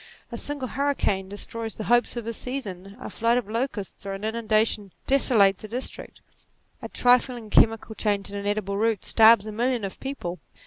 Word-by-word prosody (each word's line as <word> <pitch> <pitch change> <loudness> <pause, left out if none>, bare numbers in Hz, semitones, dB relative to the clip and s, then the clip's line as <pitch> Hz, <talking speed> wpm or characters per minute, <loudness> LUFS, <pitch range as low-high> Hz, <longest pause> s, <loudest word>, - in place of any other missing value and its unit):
A - - -4
single 285 -3 -4
hurricane 265 -9 -1
destroys 225 +2 -2
the 215 - -5
hopes 240 +2 +2
of 235 - -4
a 230 - -3
season; 205 -7 -5
a - - -7
flight 230 +2 +1
of 245 - -2
locusts, 225 -3 -4
or 195 -1 -4
an 195 +1 -7
inundation, 220 -2 0
desolates 215 -8 +3
a - - -6
district; 245 +5 -5 0.6
a - - -6
trifling 245 -3 +2
chemical 225 0 +3
change 205 -2 -1
in - - -7
an 200 0 -4
edible 205 -1 -1
root, 220 -1 0
starves 220 -2 +6
a 215 - -5
million 240 +1 0
of 195 - -7
people. 255 -10 -5
220 Hz, 180 wpm, -25 LUFS, 200-240 Hz, 0.6 s, starves